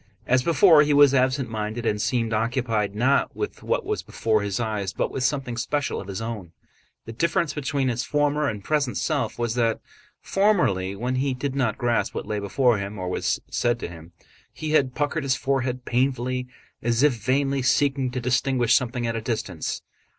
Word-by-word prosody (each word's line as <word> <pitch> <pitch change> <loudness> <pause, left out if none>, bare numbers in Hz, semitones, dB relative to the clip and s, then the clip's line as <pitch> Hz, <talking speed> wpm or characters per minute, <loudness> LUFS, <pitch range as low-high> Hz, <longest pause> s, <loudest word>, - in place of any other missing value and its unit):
As 130 +1 +3
before 165 +2 +6
he 150 -1 +3
was 145 -1 +7
absent 130 0 +2
minded 110 +1 -4
and 105 -2 0
seemed 115 -2 0
occupied 110 -2 0
not 130 +6 +2
with 420 - -4
what - - -1
was 425 -1 -2
before 110 -2 0
his 100 0 -2
eyes 105 -4 -2
but - - -1
with 130 - -3
something 130 -3 -1
special 145 +4 -1
of 95 - -11
his 100 +2 -4
own. 105 -7 -6 0.5
The 115 - -7
difference 170 +5 0
between 140 -2 -1
his 120 0 -1
former 145 0 +1
and 105 -2 -6
present 145 -2 0
self - - -1
was 120 -1 -1
that 115 -2 +1 0.4
formerly 135 - +1
when 125 +5 -2
he 135 0 0
did 135 +1 -3
not 130 -6 0
grasp 120 -1 0
what - - -3
lay 105 -1 -2
before 115 +3 +2
him 100 +1 -5
or 90 -1 -3
was - - -1
said 120 0 +1
to - - -3
him, 85 0 -12 0.4
he 155 -1 -5
had 135 -4 +2
puckered 145 +2 -1
his 135 -2 +1
forehead 130 -2 -1
painfully 125 0 0 0.3
as 120 +2 +1
if 150 -3 +5
vainly 135 +4 0
seeking 135 0 +2
to 125 +1 -3
distinguish 125 -1 +1
something 120 -1 +1
at 115 -1 -1
a 115 - -2
distance. 105 -7 -3
125 Hz, 190 wpm, -24 LUFS, 110-140 Hz, 0.5 s, was